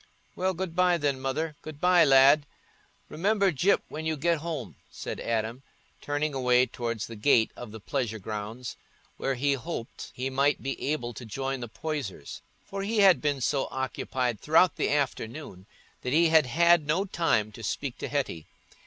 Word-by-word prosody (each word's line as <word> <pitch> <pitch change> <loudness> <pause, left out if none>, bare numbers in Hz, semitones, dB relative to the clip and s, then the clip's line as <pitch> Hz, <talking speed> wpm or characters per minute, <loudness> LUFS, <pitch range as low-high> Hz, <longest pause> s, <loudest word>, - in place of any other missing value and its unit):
"Well, 185 0 0
good 175 -1 -4
bye, 180 -1 +4
then, 145 -4 0
Mother—good 150 +3 -4
bye, 180 0 +5
lad—remember 155 +7 +2
Gyp 175 +7 +2
when 155 - -6
you 160 -1 -1
get 165 +2 +1
home," 145 - -5
said - - -6
Adam, 115 +2 -2 0.4
turning 145 +1 -1
away 125 -1 +3
towards 115 -2 -4
the 115 - -9
gate 110 0 +3
of 120 -3 -9
the 110 - -8
pleasure 115 0 -2
grounds, 110 +4 -6 0.4
where 135 - -1
he 140 +3 +1
hoped 135 -3 -6
he 130 +1 -3
might 140 +2 +1
be 135 +1 -2
able 120 -6 -3
to 120 - -9
join 135 +4 -3
the 120 -2 -6
Poysers, 135 - -5 0.2
for 195 0 -5
he 210 +2 +1
had 185 -8 +6
been 145 -3 0
so 135 +2 0
occupied 130 -3 -2
throughout 165 +4 +4
the - - 0
afternoon 130 -7 -3 0.3
that 125 - -2
he 165 +1 +5
had 160 -4 +5
had 170 +2 +4
no 175 +6 +1
time 165 - +1
to 110 - -11
speak 130 +4 -3
to - - -3
Hetty. 130 - -3
140 Hz, 170 wpm, -28 LUFS, 120-160 Hz, 0.4 s, had